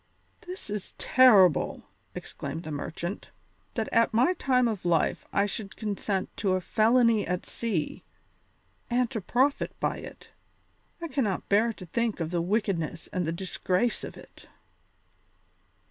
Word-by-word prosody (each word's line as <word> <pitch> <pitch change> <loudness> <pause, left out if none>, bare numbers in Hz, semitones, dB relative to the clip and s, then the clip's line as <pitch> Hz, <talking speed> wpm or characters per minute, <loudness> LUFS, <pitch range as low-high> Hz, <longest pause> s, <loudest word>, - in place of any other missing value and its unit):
"This 365 +1 -6
is 210 -2 -5
terrible," 205 - +5 0.3
exclaimed 165 - -6
the 155 - -6
merchant, 170 +5 -5 0.5
"that 225 -2 -1
at 230 -1 +3
my 255 +11 +4
time 255 -7 +2
of 215 -5 -3
life 170 -2 +1
I 200 - +2
should 205 -1 -5
consent 200 -2 -2
to 195 -3 +1
a 185 - +2
felony 225 +3 +3
at 180 0 -2
sea, 200 -10 -3 0.9
and 245 -1 +1
to 225 -5 -3
profit 260 +9 +1
by - - 0
it. - - -11 0.7
I - - -2
cannot 260 - -1
bear 215 +3 +4
to 185 - -10
think 230 +4 -1
of 165 -1 -2
the 175 -1 0
wickedness 175 -4 -1
and 180 -3 -1
the - - 0
disgrace 185 +4 -1
of - - -7
it." - - -15
205 Hz, 145 wpm, -28 LUFS, 180-235 Hz, 0.9 s, terrible